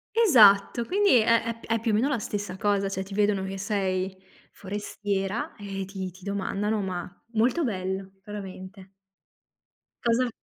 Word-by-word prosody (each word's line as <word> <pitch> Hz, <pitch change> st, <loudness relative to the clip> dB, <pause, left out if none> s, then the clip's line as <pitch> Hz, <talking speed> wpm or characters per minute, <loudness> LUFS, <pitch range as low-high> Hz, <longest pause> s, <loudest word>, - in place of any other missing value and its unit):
Esatto, 235 Hz, -, +6 dB
quindi 395 Hz, -, +4 dB
è 230 Hz, +1 st, +4 dB
è 230 Hz, 0 st, -4 dB
p -, -, -13 dB
è 230 Hz, 0 st, +1 dB
più 225 Hz, 0 st, 0 dB
o -, -, 0 dB
meno 230 Hz, +6 st, +3 dB
la 290 Hz, -, +1 dB
stessa 205 Hz, -3 st, -4 dB
cosa. 200 Hz, -1 st, +1 dB
Cioè 190 Hz, 0 st, -3 dB
ti 195 Hz, +1 st, -10 dB
vedono 205 Hz, -1 st, +2 dB
che 190 Hz, 0 st, -4 dB
sei 190 Hz, -2 st, -1 dB, 0.4 s
forestiera 200 Hz, +1 st, -3 dB
e 195 Hz, -1 st, -5 dB
ti 190 Hz, -1 st, -5 dB
ti 185 Hz, +1 st, -17 dB
domandano. 200 Hz, +2 st, -1 dB
Ma 180 Hz, -2 st, -5 dB
molto 240 Hz, +9 st, +2 dB
bello, 190 Hz, -3 st, -3 dB
veramente. 190 Hz, -2 st, -9 dB, 1.1 s
Cosa 240 Hz, +1 st, +2 dB
200 Hz, 155 wpm, -26 LUFS, 190-225 Hz, 1.1 s, Esatto